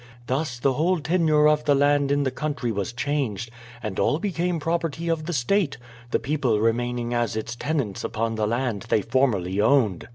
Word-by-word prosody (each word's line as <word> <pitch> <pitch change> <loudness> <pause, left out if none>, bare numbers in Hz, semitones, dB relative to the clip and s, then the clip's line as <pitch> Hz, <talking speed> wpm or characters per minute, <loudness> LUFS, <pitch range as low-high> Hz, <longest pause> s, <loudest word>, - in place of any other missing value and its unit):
Thus 130 0 -2
the 135 +2 +1
whole 170 +6 +1
tenure 155 -2 +3
of 150 0 +2
the 145 -1 +4
land 145 0 +3
in 145 0 +2
the 130 - 0
country 145 -4 -2
was 100 -1 -2
changed, 120 -4 -2 0.3
and 105 -3 -3
all 145 - +2
became 180 -2 -1
the 150 - -8
property 165 0 -1
of 160 -1 -1
the - - -1
state, 155 +3 +1 0.3
the - - +2
people 130 -4 0
remaining 120 +2 0
as 120 -3 0
its 115 +2 -4
tenants 135 -7 -2
upon 115 +1 -2
the 110 -1 0
land 120 -3 -2
they 105 - +2
formerly 105 -6 +1
owned. 110 -7 +2
135 Hz, 190 wpm, -24 LUFS, 115-155 Hz, 0.3 s, the